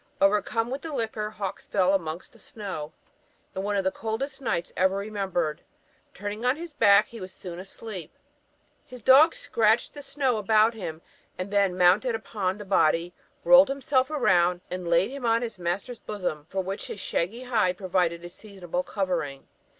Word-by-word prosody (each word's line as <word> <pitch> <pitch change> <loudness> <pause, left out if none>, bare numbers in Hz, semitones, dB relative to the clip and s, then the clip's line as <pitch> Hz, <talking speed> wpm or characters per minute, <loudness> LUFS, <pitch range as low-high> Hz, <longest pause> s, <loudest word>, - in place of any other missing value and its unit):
Overcome 210 +4 +2
with 270 - -3
the 325 - -6
liquor, 220 -5 -2
Hawkes 200 -2 -6
fell 190 -1 +2
amongst 170 -2 -3
the 230 - -18
snow, 190 -8 -7 0.6
in 190 - -2
one 205 +1 -1
of 195 - +1
the 190 - +1
coldest 265 +7 -4
nights 175 -9 -2
ever 190 +1 +2
remembered: 195 -6 -2 0.5
turning 205 +3 -5
on 250 +2 +3
his 335 0 -8
back, 205 -7 +5
he 230 -3 -10
was 185 0 -7
soon 180 -2 -8
asleep; 190 -2 -8 0.7
his 250 -3 -12
dog 280 +7 +7
scratched 220 +1 +1
the 290 - -8
snow 275 -4 0
about 215 +2 +4
him, 170 -7 -7 0.3
and 185 +2 -5
then 200 -3 +2
mounted 185 +7 +4
upon 205 -4 -3
the 205 - -8
body, 175 -2 +2 0.3
rolled 270 +1 +7
himself 270 -1 +1
round, 180 - +2
and 180 -1 -4
laid 170 +7 +3
him 275 -1 -7
on 230 0 +2
his 225 -5 -5
master's 190 +8 -3
bosom, 180 -8 -4
for 190 - -1
which 195 +2 -5
his - - -7
shaggy 210 +10 -2
hide 215 -8 +1
proved 185 -2 -8
a 170 -1 +1
seasonable 180 -3 -5
covering. 180 -9 -3
200 Hz, 175 wpm, -26 LUFS, 180-230 Hz, 0.7 s, dog